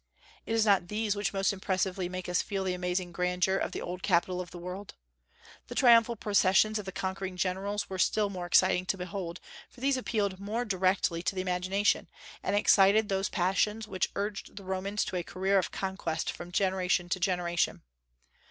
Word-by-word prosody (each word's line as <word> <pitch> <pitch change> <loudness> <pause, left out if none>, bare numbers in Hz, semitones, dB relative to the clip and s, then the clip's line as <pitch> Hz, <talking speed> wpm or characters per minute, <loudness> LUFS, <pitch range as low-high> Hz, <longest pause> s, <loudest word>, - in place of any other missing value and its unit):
It - - -1
is 225 -1 +3
not 195 -4 +3
these 210 +1 -1
which 205 0 -1
most 195 0 +1
impressively 190 -1 -1
make 185 0 -5
us 180 0 +1
feel 195 -1 -3
the 185 -1 -1
amazing 180 0 -2
grandeur 180 +2 +1
of - - -2
the - - -5
old 180 +1 -5
capital 180 -1 +1
of 180 - -8
the 175 - -10
world. 180 +3 -7 0.7
The - - -7
triumphal 235 -1 +5
processions 205 0 +3
of 205 - -7
the 190 - -5
conquering 190 0 -4
generals 195 +3 -1
were 190 -1 -6
still 210 +4 +2
more 180 -3 -5
exciting 180 +1 +3
to 195 - 0
behold, 180 -1 -5 0.3
for - - -18
these 270 +1 +2
appealed 205 -6 -1
more 215 +5 -2
directly 185 -4 +1
to 185 - -2
the 185 - -1
imagination, 185 +2 +1 0.3
and - - -1
excited 205 +1 +5
those 195 0 0
passions 210 +4 0
which 190 -3 -1
urged 205 0 -4
the 200 - -9
Romans 190 +2 -2
to 185 - -3
a 175 - -2
career 190 +3 +1
of 180 - -2
conquest 190 -4 -3
from 175 0 -9
generation 185 -1 +1
to 185 - 0
generation. 175 -2 0
190 Hz, 190 wpm, -30 LUFS, 180-205 Hz, 0.7 s, triumphal